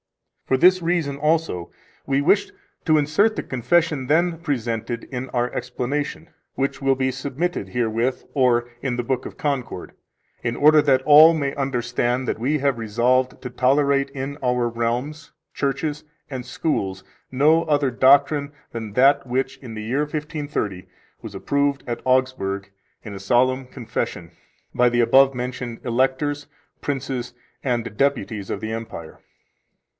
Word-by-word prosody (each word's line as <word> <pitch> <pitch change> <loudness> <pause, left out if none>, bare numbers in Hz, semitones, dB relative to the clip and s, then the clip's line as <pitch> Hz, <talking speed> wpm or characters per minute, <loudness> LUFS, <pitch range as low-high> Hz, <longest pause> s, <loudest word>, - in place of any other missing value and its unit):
For 130 - +2
this 185 +5 +5
reason 165 -5 0
also 150 - 0 0.3
we 135 0 +1
wished 200 - +2 0.3
to 155 -2 +3
insert 200 +10 +2
the - - -3
confession 135 +2 0
then 165 +3 +2
presented 120 -6 -3
in 130 0 -6
our 120 0 -1
explanation, 145 +4 -3 0.3
which 135 +1 -2
will 135 0 +3
be 130 0 0
submitted 135 - -3
herewith 120 +3 -1
or 125 -3 +2
in 130 -3 -1
the 120 - -1
Book 130 +1 -2
of - - -12
Concord, 135 -10 -3 0.5
in 120 0 -2
order 150 +1 +6
that 135 -3 +3
all 155 +3 +8
may 140 -3 -1
understand 125 -2 -1
that - - -2
we 140 +6 +1
have 135 -4 0
resolved 125 +4 +1
to 125 - -4
tolerate 140 +2 +2
in 140 +1 -5
our 125 -1 +1
realms, 120 +7 -3 0.2
churches, 145 +2 -2 0.3
and 130 -3 -5
schools 95 -11 -2 0.3
no 155 +5 +4
other 145 -3 +1
doctrine 140 +3 +4 0.2
than 110 -3 -6
that 135 +5 +4
which, 130 +2 -1
in 120 -4 -9
the 110 - -5
year 125 +6 -1
1530, 150 - -4 0.3
was - - -9
approved 140 -1 0
at 120 -1 -3
Augsburg 130 -7 0 0.3
in 105 - -8
a 100 - -7
solemn 130 +5 +1
confession, 125 -3 -5 0.4
by 125 0 +4
the 120 0 0
above 135 +3 +5
mentioned 125 -1 -5
Electors, 135 +4 0 0.3
Princes, 130 -3 -3 0.3
and 120 -4 -2
Deputies 110 -7 -1
of - - -3
the 110 +1 -5
Empire. 110 -8 -7
130 Hz, 145 wpm, -22 LUFS, 120-145 Hz, 0.5 s, all